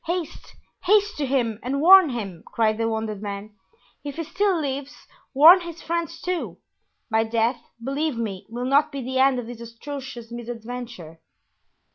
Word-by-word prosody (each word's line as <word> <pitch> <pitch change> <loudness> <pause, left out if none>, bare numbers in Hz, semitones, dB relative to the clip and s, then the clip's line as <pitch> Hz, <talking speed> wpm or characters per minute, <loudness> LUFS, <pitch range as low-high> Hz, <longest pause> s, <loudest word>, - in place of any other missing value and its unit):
"Haste! 345 -1 -4 0.3
haste 410 +2 +3
to 290 -2 -1
him 240 -5 0
and 265 +3 -2
warn 365 +1 +8
him," 200 -9 -5
cried 220 -1 +1
the 225 0 +1
wounded 220 -2 -3
man, 205 0 -6 0.5
"if 285 -1 -6
he 330 - -3
still 370 +2 0
lives; 280 -1 -5 0.3
warn 320 +7 +8
his 340 -1 -9
friends, 335 -1 -3
too. 360 -1 -3 0.5
My 220 0 +3
death, 230 +2 0 0.2
believe 280 0 -1
me, 200 -4 -4
will 240 +2 -4
not 285 +3 +3
be 275 -2 -5
the 260 +1 -2
end 265 -1 +4
of 245 - -4
this 235 0 -9
atrocious 240 0 -8
misadventure." 235 -7 -7
255 Hz, 160 wpm, -24 LUFS, 225-305 Hz, 0.5 s, warn